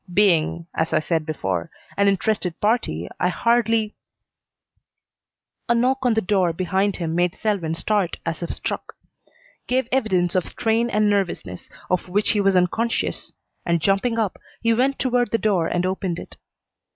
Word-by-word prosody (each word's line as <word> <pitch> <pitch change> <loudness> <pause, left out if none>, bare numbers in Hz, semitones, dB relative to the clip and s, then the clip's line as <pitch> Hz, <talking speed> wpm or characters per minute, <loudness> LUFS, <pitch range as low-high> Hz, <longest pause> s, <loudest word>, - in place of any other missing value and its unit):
Being, 170 -4 +3
as 160 0 -1
I 155 - +4
said 160 0 -1
before, 95 - -2 0.3
an 200 0 +3
interested 195 -2 0
party, 205 - 0
I 180 - +2
hardly 225 +1 +2 0.4
" - - -54
A 235 - +4
knock 255 +3 +2
on 235 - +3
the 220 - +2
door 185 -3 +2
behind 190 +3 0
him 165 -2 -3
made 175 +1 +1
Selwyn 195 -7 -1
start 200 0 0
as 165 +1 -3
if 170 - -4
struck; - - -4 0.7
gave 255 -1 +1
evidence 190 -9 +1
of 185 -2 +1
strain 230 +1 0
and 210 -1 +2
nervousness 190 - -2 0.2
of 180 0 -1
which 205 +3 +2
he 210 - +2
was 195 -1 +3
unconscious, 220 +6 0 0.3
and, 170 -1 +1
jumping 195 +7 +1
up, 215 -4 -1 0.2
he 230 0 +4
went 265 +4 +1
toward 245 -2 +1
the 230 - +1
door 195 -6 +1
and 175 +1 0
opened 185 -2 -2
it. - - -9
195 Hz, 165 wpm, -23 LUFS, 175-225 Hz, 0.7 s, I